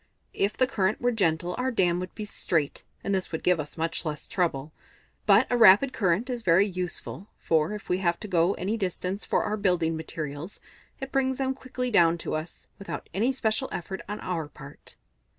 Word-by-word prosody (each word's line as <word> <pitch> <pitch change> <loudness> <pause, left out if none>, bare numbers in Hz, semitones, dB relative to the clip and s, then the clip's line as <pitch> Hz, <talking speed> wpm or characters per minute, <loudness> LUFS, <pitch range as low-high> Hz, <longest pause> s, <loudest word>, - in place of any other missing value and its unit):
If 200 +2 0
the 255 - +5
current 210 -5 0
were 245 0 +2
gentle, 175 -5 +1
our 255 +1 +1
dam 180 -7 +2
would 185 0 -6
be 215 - -5
straight, 160 -7 -1 0.2
and 200 - -1
this 190 -1 -1
would 160 - -4
give 180 -2 +3
us 150 +2 -5
much 165 +1 0
less 150 -3 -4
trouble. 155 -5 -1 0.5
But 205 +4 +6
a - - +3
rapid 230 +4 +7
current 195 +3 +1
is 245 -2 -3
very 185 0 +5
useful, 185 0 -4
for 160 +4 +1
if 210 - -7
we 180 - +1
have 170 -2 +1
to - - -5
go 175 0 +2
any 200 +5 -2
distance 190 0 -3
for - - +1
our 210 +1 -1
building 180 -5 +1
materials, 160 +1 -6 0.4
it 270 -1 -6
brings 265 -1 +1
them 265 -1 0
quickly 255 -1 -4
down 170 -5 +5
to - - -5
us, 155 +2 -5
without 200 - -6
any 230 +7 +2
special 255 0 -1
effort 190 +3 -5
on 210 - -4
our 165 -4 -3
part." 145 0 -11
185 Hz, 200 wpm, -27 LUFS, 165-220 Hz, 0.5 s, rapid